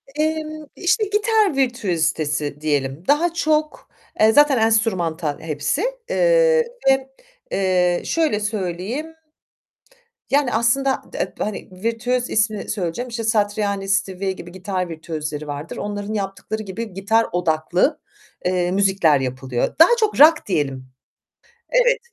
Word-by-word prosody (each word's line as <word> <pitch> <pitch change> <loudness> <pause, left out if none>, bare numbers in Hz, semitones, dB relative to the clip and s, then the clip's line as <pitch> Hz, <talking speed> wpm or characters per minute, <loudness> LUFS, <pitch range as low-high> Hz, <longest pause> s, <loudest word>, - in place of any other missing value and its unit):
Emm, 310 0 -2
işte 365 +5 +1
gitar 420 - +2
virtüözitesi 160 - -1
diyelim. 145 0 -1
Daha 330 +4 +3
çok, 310 -2 -1 0.3
eee, 220 +1 +6
zaten 290 +2 +5
enstrümantal 185 -9 +1
hepsi, 155 - -2 0.3
eee, - - +4 0.3
ve, 270 0 +2 0.4
eee, 180 -2 +1
şöyle 315 -10 +1
söyleyeyim, 210 - -4 1.2
yani, 275 -2 +2
aslında, 265 +4 +1
d - - -3
hani, 210 -1 -4
virtüöz 230 +5 -2
ismini 215 -1 0
söyleyeceğim. 200 +4 -3
İşte 230 -1 -4
Satriani 205 -2 0
ve 190 +1 -3
gibi 175 -2 -10
gitar 185 -1 -3
virtüözleri 155 -2 -5
vardır. 145 +2 -6
Onların 205 0 -4
yaptıkları 205 +2 -4
gibi 215 +2 -6
gitar 220 +4 +2
odaklı, 175 - +1 0.4
eee, 180 -1 +1
müzikler 190 -7 +3
yapılıyor. 130 -1 -2
Daha 325 - +9
çok 430 -7 0
rock 310 +1 +7
diyelim. 140 -8 -2 0.8
Evet, - - +3
205 Hz, 115 wpm, -21 LUFS, 175-275 Hz, 1.2 s, Daha